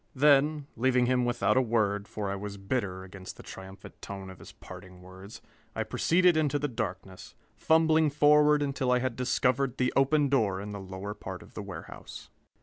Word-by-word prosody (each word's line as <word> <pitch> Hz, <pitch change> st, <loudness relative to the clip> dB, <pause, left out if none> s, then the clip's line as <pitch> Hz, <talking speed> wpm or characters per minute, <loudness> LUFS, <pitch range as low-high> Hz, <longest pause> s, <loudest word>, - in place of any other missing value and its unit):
Then, 145 Hz, +1 st, +4 dB
leaving 125 Hz, +1 st, +2 dB
him 125 Hz, 0 st, +1 dB
without 120 Hz, -3 st, +1 dB
a -, -, +5 dB
word, 105 Hz, -4 st, 0 dB
for 100 Hz, -2 st, -4 dB
I -, -, -2 dB
was 100 Hz, 0 st, -6 dB
bitter 95 Hz, -2 st, -3 dB
against 95 Hz, 0 st, -10 dB
the -, -, -12 dB
triumphant 95 Hz, +1 st, -11 dB
tone 95 Hz, -1 st, -7 dB
of 95 Hz, -, -14 dB
his -, -, -12 dB
parting 90 Hz, -1 st, -13 dB
words, 95 Hz, +3 st, -12 dB, 0.3 s
I -, -, -1 dB
proceeded 180 Hz, 0 st, +3 dB
into 150 Hz, -2 st, +1 dB
the 145 Hz, +1 st, -1 dB
darkness, 95 Hz, -6 st, -6 dB, 0.2 s
fumbling 160 Hz, -1 st, +3 dB
forward 150 Hz, 0 st, +4 dB
until 135 Hz, -2 st, -1 dB
I 125 Hz, -, +4 dB
had 125 Hz, -1 st, -2 dB
discovered 130 Hz, +1 st, 0 dB
the 125 Hz, 0 st, 0 dB
open 140 Hz, +2 st, +3 dB
door 110 Hz, -9 st, +1 dB
in 105 Hz, +1 st, -6 dB
the 100 Hz, -, -6 dB
lower 95 Hz, +2 st, -6 dB
part -, -, -8 dB
of -, -, -18 dB
the -, -, -6 dB
warehouse. -, -, -10 dB
125 Hz, 185 wpm, -28 LUFS, 100-140 Hz, 0.3 s, a